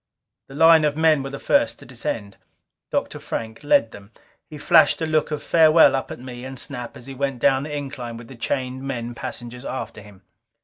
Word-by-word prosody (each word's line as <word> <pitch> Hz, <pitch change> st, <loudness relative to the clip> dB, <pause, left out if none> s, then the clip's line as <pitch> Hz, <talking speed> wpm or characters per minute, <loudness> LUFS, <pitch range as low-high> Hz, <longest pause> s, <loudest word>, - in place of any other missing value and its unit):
The 135 Hz, -, -12 dB
line 160 Hz, +1 st, +6 dB
of 150 Hz, 0 st, 0 dB
men 160 Hz, -3 st, +4 dB
were 135 Hz, -, -5 dB
first 285 Hz, -, +1 dB
to -, -, -14 dB
descend. 115 Hz, -4 st, -5 dB, 0.5 s
Dr. -, -, -2 dB
Frank 110 Hz, +2 st, -6 dB
led 115 Hz, -6 st, +3 dB
them. 100 Hz, 0 st, -13 dB, 0.4 s
He 150 Hz, -, -9 dB
flashed 160 Hz, +2 st, +4 dB
a 160 Hz, -, -1 dB
look 155 Hz, -1 st, +1 dB
of 150 Hz, -1 st, -4 dB
farewell 160 Hz, -3 st, +5 dB
up 135 Hz, -, -3 dB
at -, -, -7 dB
me 125 Hz, -1 st, -9 dB
and 130 Hz, 0 st, -7 dB
Snap 125 Hz, -3 st, -6 dB
as 120 Hz, -, -12 dB
he 135 Hz, -, -8 dB
went 135 Hz, 0 st, -2 dB
down 135 Hz, +1 st, +3 dB
the 150 Hz, +1 st, -4 dB
incline 125 Hz, -5 st, -6 dB
with 115 Hz, 0 st, -11 dB
the 135 Hz, -, -11 dB
chained 130 Hz, +2 st, -3 dB
men 120 Hz, -3 st, -4 dB
passengers 120 Hz, +1 st, -7 dB
after 130 Hz, -5 st, -6 dB
him. 100 Hz, -2 st, -16 dB
135 Hz, 205 wpm, -22 LUFS, 120-150 Hz, 0.5 s, line